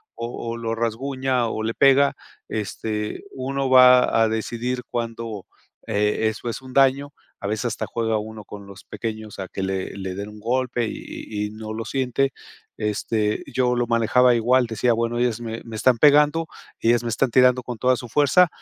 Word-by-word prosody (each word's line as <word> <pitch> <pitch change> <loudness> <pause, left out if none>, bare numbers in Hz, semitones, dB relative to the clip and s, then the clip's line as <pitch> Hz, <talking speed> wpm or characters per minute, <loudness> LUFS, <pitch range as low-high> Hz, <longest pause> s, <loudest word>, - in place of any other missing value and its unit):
o 120 0 -5
o - - -5
lo 115 -1 -3
rasguña 130 +2 -1
o 110 - -3
le 115 +1 -1
pega, 140 0 +4 0.3
este, 105 0 -4
uno 135 +1 -2
va 125 -2 +6
a - - +3
decidir 120 +3 -2
cuando, 115 -3 -4 0.4
eh, 105 +1 +1
eso 110 +2 -5
es 115 - -5
un 130 -1 -11
daño, 140 +1 +3 0.3
a 100 - -4
veces 110 +3 -2
hasta 115 -3 -2
juega 115 -1 -1
uno 110 0 -7
con 100 0 -10
los 100 -1 -13
pequeños 110 -2 -6
a 95 - -4
que - - -5
le 95 0 -3
le 95 -1 -5
den 100 +2 -5
un 105 0 -12
golpe 120 +1 -1
y 105 -1 -6
y - - -10
no 110 0 -7
lo 115 +1 -5
siente. 135 0 0 0.4
Este, 105 0 -1
yo 125 -2 +1
lo 120 0 +1
manejaba 120 +2 +3
igual, 125 +2 +3
decía 115 +1 +1
bueno, 115 +1 -1
ellas 120 -2 0
me 115 -1 -5
me 115 -1 -9
están 125 +2 +3
pegando, 150 +3 +5 0.3
ellas 120 0 +2
me 120 - -2
están 120 +3 +1
tirando 125 0 +5
con 125 -2 -6
toda 130 +3 +3
su 120 - -8
fuerza, 150 +7 +4
115 Hz, 185 wpm, -23 LUFS, 110-130 Hz, 0.4 s, va